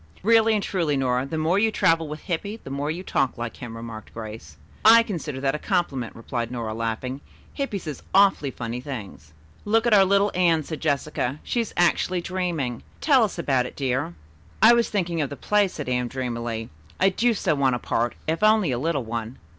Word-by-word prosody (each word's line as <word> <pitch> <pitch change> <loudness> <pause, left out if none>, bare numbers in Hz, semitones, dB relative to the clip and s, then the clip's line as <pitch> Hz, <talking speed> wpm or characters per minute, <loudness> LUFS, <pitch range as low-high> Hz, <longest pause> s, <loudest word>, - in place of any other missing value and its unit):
"Really 225 +1 +5
and 205 - 0
truly, 165 -7 0
Nora, 130 0 0
the 160 - -4
more 165 +5 +2
you 220 +1 +3
travel 165 -6 +2
with 150 +1 -7
Hippy, 200 +5 -3
the 135 - -8
more 140 +2 -2
you 170 +4 -3
talk 135 -8 0
like 120 -1 -5
him," 115 -2 -8
remarked 115 -1 -9
Grace. 105 -10 -8 0.3
"I 230 +2 +8
consider 165 - -5
that 135 -1 +1
a 150 - -3
compliment," 140 - -1
replied 115 0 -4
Nora, 115 -3 -4
laughing. 115 +4 -3 0.3
"Hippy 275 -8 -2
says 155 -7 -7
awfully 195 -7 +4
funny 120 -1 -5
things." 105 - -8 0.3
"Look 225 +2 +2
at 235 - +3
our 200 -2 +7
little 200 +1 +3
Anne," 170 -3 +3
said 155 0 -6
Jessica. 140 -1 -1
"She 240 - 0
is 225 - -5
actually 175 +1 +2
dreaming. 170 -10 -2 0.2
Tell 275 -6 +4
us 210 - -2
about 135 -6 +1
it, - - -12
dear." 130 -9 -1 0.4
"I 220 +3 +8
was 235 -1 +2
thinking 175 -5 -1
of 145 - -1
the 140 - -6
play," 210 -1 +2
said 150 -6 -7
Anne 125 -1 0
dreamily. 120 -3 -4 0.3
"I 190 - +5
do 230 +5 +1
so 180 -5 +1
want 135 -3 +2
a - - -1
part, 120 0 -1
if 160 +3 -1
only 215 -7 +4
a 120 - -1
little 145 -2 -1
one." 115 +1 -5
150 Hz, 205 wpm, -24 LUFS, 125-190 Hz, 0.4 s, I